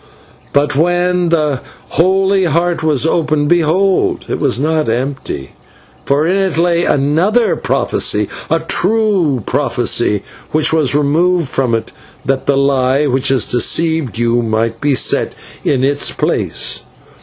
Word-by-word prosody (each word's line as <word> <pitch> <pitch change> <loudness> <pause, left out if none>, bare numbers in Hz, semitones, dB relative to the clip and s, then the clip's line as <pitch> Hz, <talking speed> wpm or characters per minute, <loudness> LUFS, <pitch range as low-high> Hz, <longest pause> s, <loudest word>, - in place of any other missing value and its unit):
But 145 0 +1
when 175 +2 +1
the 150 -5 0 0.3
holy 190 +2 +2
Heart 170 +1 0
was 155 -3 +1
opened, 155 -3 0
behold! 175 +3 +1
it - - -2
was 115 - +1
not 155 -1 0
empty, 125 - -4 0.5
for 145 +3 +1
in 185 +4 +1
it 190 -4 0
lay 170 0 +2
another 165 - +1
prophecy 105 -1 0 0.2
a 165 0 +1
true 185 - +1
prophecy 105 -1 0 0.3
which 155 +1 0
was 145 -5 +1
removed 160 +2 +1
from 125 -4 0
it, 115 0 -4 0.3
that 135 0 -1
the 140 - +2
lie 135 0 +2
which 135 -1 0
has 130 -5 +2
deceived 160 +1 0
you 120 +1 +1
might 115 0 -2
be 145 -2 +1
set - - +1 0.3
in 130 -2 0
its 140 +1 +1
place." - - -2
150 Hz, 135 wpm, -14 LUFS, 135-175 Hz, 0.5 s, holy